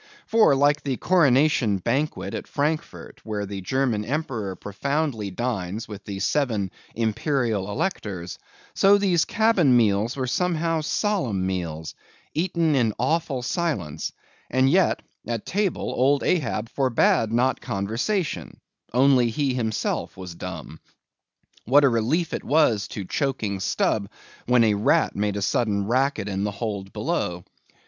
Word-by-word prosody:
For, 220 -10 +4
like 145 +2 +3
the 135 -3 -2
Coronation 140 - +3
banquet 140 - -2
at - - -5
Frankfort, 155 +2 -3
where 105 -2 -3
the 100 -1 -6
German 120 0 0
Emperor 120 -7 -3
profoundly 125 - -2
dines 105 -1 -3
with 105 -2 -9
the 100 -1 -5
seven 110 -8 0 0.2
Imperial 115 -2 0
Electors, 100 - -3 0.3
so 200 +1 +5
these 185 -5 +2
cabin 200 - +3
meals 110 +2 +2
were 130 - -1
somehow 165 +2 0
solemn 150 - 0
meals, 85 -4 -3 0.4
eaten 165 -2 +1
in 115 -6 +2
awful 135 0 0
silence; 105 - -2 0.4
and 130 +2 +3
yet 185 +2 +2 0.2
at 115 -2 -3
table 200 -2 -1
old 140 +3 +3
Ahab 115 -9 0
forbade 115 -4 +2
not 125 +3 +1
conversation; 115 - -2 0.3
only 125 -1 +4
he 135 +3 0
himself 110 -4 -2
was 90 -2 -7
dumb. - - -8 0.9
What 145 +5 +5
a 140 - +6
relief 130 +9 0
it - - -3
was 140 -9 +2
to 100 - -6
choking 110 - -2
Stubb, 100 +1 0 0.4
when 125 -1 +5
a 110 -2 +3
rat 100 +1 +2
made 105 0 -1
a 100 - -2
sudden 100 -2 +1
racket 130 0 0
in 95 -1 -2
the 105 - 0
hold 100 -2 -4
below. 85 0 -2
120 Hz, 135 wpm, -24 LUFS, 100-150 Hz, 0.9 s, a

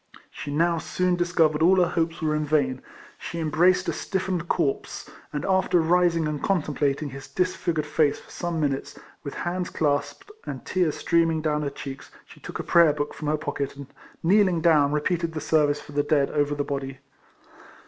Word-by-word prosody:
She - - -7
now 165 +3 +1
soon 180 +3 0
discovered 165 -3 +2
all 180 +4 +6
her 180 -2 +3
hopes 165 -1 -1
were 155 -1 +1
in 150 0 0
vain; 140 -4 0 0.4
she 170 - -6
embraced 180 +4 +2
a 170 - 0
stiffened 180 +1 -2
corpse, 140 -6 -1 0.2
and 150 - -3
after 190 -2 +2
rising 170 -1 +2
and 150 -1 -3
contemplating 150 -5 0
his 135 +1 -9
dis 180 0 -1
figured 160 -3 -1
face 150 -1 +1
for - - -17
some 170 -2 -3
minutes, 145 -1 -2 0.3
with 140 - -6
hands 180 +1 -3
clasped, 145 - -2
and - - -7
tears 180 -5 0
streaming 165 -2 +1
down 150 -1 0
her 145 - -1
cheeks 135 -1 -8 0.2
she - - -16
took - - -7
a - - -4
prayer 170 -3 +5
book 145 0 -3
from 150 - -6
her 155 +1 +1
pocket, 145 -2 -4
and 140 -1 -11 0.3
kneeling 185 0 +4
down, 155 -4 +4
repeated 165 +2 -1
the 155 - -3
service 150 -1 +2
for 145 - -13
the 145 0 +1
dead 145 -1 +1
over 145 0 0
the 145 - -1
body. 135 -1 -4
155 Hz, 190 wpm, -25 LUFS, 145-175 Hz, 0.4 s, all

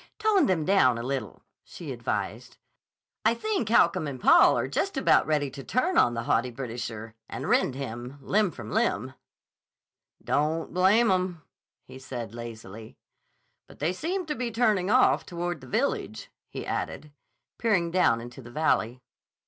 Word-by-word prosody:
"Tone 435 -3 +3
them 170 -5 +1
down 130 -11 +4
a 115 - -4
little," 135 +1 -4 0.2
she - - -9
advised. - - -4 0.7
"I 225 +2 +3
think 325 - -2
Holcomb 185 -7 +3
and 135 -3 -6
Paul - - +6
are - - -1
just - - -2
about - - +3
ready 145 -3 0
to 135 - -9
turn 330 - 0
on 120 - +4
the 115 - -3
haughty 120 +2 +1
Britisher, 115 -3 -6 0.2
and - - -5
rend 130 - +2
him 125 0 -6
limb 205 +8 +1
from 120 -9 -9
limb." 130 +6 0 1.1
"Don't 155 +3 -1
blame 195 +5 +4
'em," 180 -3 -1 0.4
he 130 +1 -12
said 120 -4 -7
lazily. 110 -2 -9 0.7
"But - - -16
they 160 +5 -1
seem 355 - -3
to 305 - -2
be 250 -4 -3
turning 215 -5 +1
off 255 +3 +4
toward 175 -3 -4
the 130 - -12
village," - - -2 0.2
he - - -6
added, 150 - -4 0.5
peering 190 -7 +1
down 170 -10 +3
into 120 +2 -10
the 120 - -12
valley. 125 -4 0
150 Hz, 155 wpm, -27 LUFS, 120-200 Hz, 1.1 s, Paul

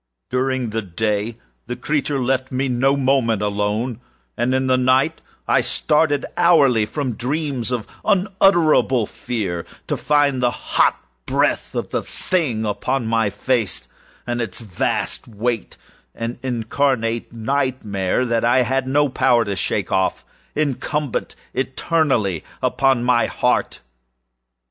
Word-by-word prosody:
During 130 -2 0
the 115 +1 -1
former 105 +3 -2 0.3
the 125 - -3
creature 145 -1 0
left 130 +1 0
me 130 +1 0
no 135 +2 +2
moment 130 -6 +2
alone, 105 +4 -1 0.3
and 120 +2 +1
in 130 0 +1
the 130 0 +3
latter 130 +5 +2 0.3
I - - +4
started 150 -1 +1
hourly 145 -11 +4
from 135 +1 -2
dreams 130 +1 -2
of 120 -4 -2 0.2
unutterable 185 - +3
fear 95 -8 -4 0.2
to - - -1
find 145 -3 +2
the 125 - +3
hot 120 - +1 0.3
breath - - 0
of - - -3
the - - 0
thing 130 -12 -1
upon 125 +5 -1
my 110 -2 +1
face, 110 +1 -1 0.4
and 120 0 -2
its 110 -5 -5
vast 105 +2 -2
weightâan 115 +1 -5
incarnate 120 -1 -1
nightmare 115 -4 -1
that 115 -2 0
I 120 +2 +4
had 130 +1 0
no 145 +2 +3
power 125 -3 +3
to 100 -1 -2
shake 90 - -1
offâincumbent 140 +8 -2 0.2
eternally 130 - 0 0.2
upon 135 -3 +2
my 125 -1 +3
_heart! - - 0
125 Hz, 125 wpm, -21 LUFS, 115-135 Hz, 0.4 s, I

